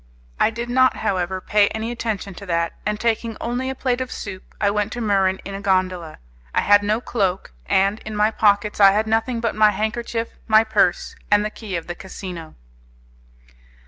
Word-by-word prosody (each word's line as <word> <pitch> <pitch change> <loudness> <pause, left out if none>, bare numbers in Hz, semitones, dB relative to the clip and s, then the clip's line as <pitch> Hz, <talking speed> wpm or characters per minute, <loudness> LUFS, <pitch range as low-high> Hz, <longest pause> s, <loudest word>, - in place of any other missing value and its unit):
I - - +4
did 235 +2 -5
not, 255 +1 +3
however, 190 -3 -1
pay 205 +2 +3
any 220 +2 -3
attention 220 -4 -4
to 200 - -10
that, 170 -1 0
and 210 0 -1
taking 230 -1 -1
only 245 +2 -2
a 265 - -3
plate 255 -1 -1
of 255 - -4
soup 190 -2 -8
I 205 -1 +2
went 210 +1 -1
to 240 - -5
Muran 195 -4 +1
in 195 - -6
a 195 - -5
gondola. 185 -4 0 0.4
I - - +4
had 205 0 +5
no 210 +2 0
cloak, 195 - -2
and 195 +3 +2
in 215 0 -7
my 210 +1 +3
pockets 210 -1 +2
I 195 -1 +8
had 215 +2 +1
nothing 225 +2 0
but 230 -2 0
my 215 0 +5
handkerchief, 225 +2 -2 0.2
my 220 0 +6
purse, 210 -5 +1
and 205 0 +4
the 215 - -3
key 210 -5 -6
of 170 - -3
the 175 - -5
casino. 180 -3 -8
210 Hz, 195 wpm, -22 LUFS, 195-225 Hz, 0.4 s, I